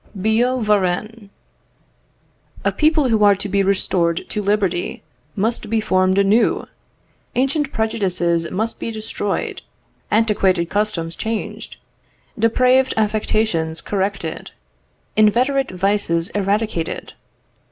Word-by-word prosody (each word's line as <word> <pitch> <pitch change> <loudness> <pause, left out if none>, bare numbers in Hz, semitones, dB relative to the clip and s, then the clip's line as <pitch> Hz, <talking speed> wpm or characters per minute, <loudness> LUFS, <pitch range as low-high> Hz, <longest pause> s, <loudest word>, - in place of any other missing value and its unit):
Billaud 235 +5 +1
Varennes. 210 +1 0 1.4
"A - - +3
people 305 -3 +2
who 220 -2 +3
are 205 -1 +6
to 200 +1 -4
be 200 0 +1
restored 180 -3 +1
to 210 - -2
liberty 200 -3 -1 0.3
must 220 +1 -1
be 225 0 +1
formed 185 -2 +2
anew. 200 +4 +3 0.7
Ancient 275 +3 +1
prejudices 180 -6 0
must 220 +5 -3
be - - -3
destroyed, 215 -2 -3 0.5
antiquated 195 -6 +2
customs 185 -5 -1
changed, 225 0 -4 0.6
depraved 255 +4 +3
affections 210 -6 0
corrected, 195 -5 -3 0.7
inveterate 250 +6 +3
vices 185 -2 0
eradicated. 205 -3 -2
210 Hz, 100 wpm, -20 LUFS, 185-225 Hz, 1.4 s, are